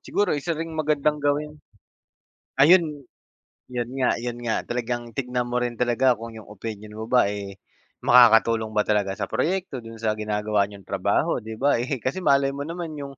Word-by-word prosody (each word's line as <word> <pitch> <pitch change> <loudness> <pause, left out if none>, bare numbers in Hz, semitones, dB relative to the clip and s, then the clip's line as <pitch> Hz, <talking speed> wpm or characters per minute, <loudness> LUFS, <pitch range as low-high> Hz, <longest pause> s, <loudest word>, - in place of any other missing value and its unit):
siguro 205 -1 0
isa 155 +3 -2
ring 165 +1 -5
magandang 150 -1 0
gawin. 145 +1 0 1.1
Ayun, 155 -1 +5 0.7
'yon 120 -1 -2
nga 130 -2 +2
'yon 120 0 -4
nga 110 - 0
talagang 120 0 -3
tignan 125 -2 -2
mo 120 - -1
rin 125 -1 -1
talaga 125 +2 +2
kung 115 0 -8
yung 110 - -11
opinion 105 0 -8
mo 110 +1 -6
ba 125 -3 +5
eh, 100 -1 -5 0.5
makakatulong 115 -2 +6
ba 105 - +3
talaga 100 -2 0
sa - - -2
proyekto 180 -7 -2
do'n 115 0 -10
sa 110 -1 0
ginagawa 105 -1 0
niyong 100 -2 -13
trabaho, - - 0
'di 110 0 -8
ba 135 -1 +2
eh. 130 +3 -2
Kasi 130 - -3
malay 140 -4 +3
mo 140 - -5
naman 170 -2 -5
yung 140 -1 -8
120 Hz, 180 wpm, -24 LUFS, 110-145 Hz, 1.1 s, makakatulong